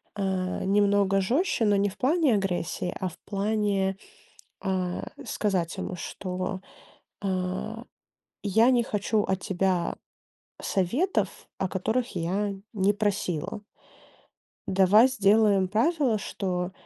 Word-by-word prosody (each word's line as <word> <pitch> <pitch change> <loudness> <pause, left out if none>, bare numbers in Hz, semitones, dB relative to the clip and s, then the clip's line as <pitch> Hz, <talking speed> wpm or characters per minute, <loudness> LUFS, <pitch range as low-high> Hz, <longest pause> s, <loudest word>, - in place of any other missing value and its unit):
э, 190 -3 -1
немного 200 0 +3
жёстче, 255 - +1
но 205 -1 +4
не 200 +1 +2
в 195 - -13
плане 290 -3 +3
агрессии, 180 -2 -2
а 190 - -1
в - - -15
плане, 200 -1 0 0.7
а, 185 -2 -2 0.2
сказать 190 -7 -1
ему, 185 - -4
что 185 +2 -4 0.6
а 190 +4 -2 0.6
я 220 +4 +4
не 245 -2 +4
хочу 210 0 0
от 190 0 -1
тебя 185 -2 0 0.7
советов, 250 - +1 0.3
о 190 - 0
которых 225 +6 -1
я 195 +5 -1 0.2
не 200 +1 +3
просила 205 -3 -2 1.1
"давай 195 +5 +6
сделаем 205 -5 +3
правило, 245 - +2
что 185 -2 -3
195 Hz, 110 wpm, -27 LUFS, 185-215 Hz, 1.1 s, давай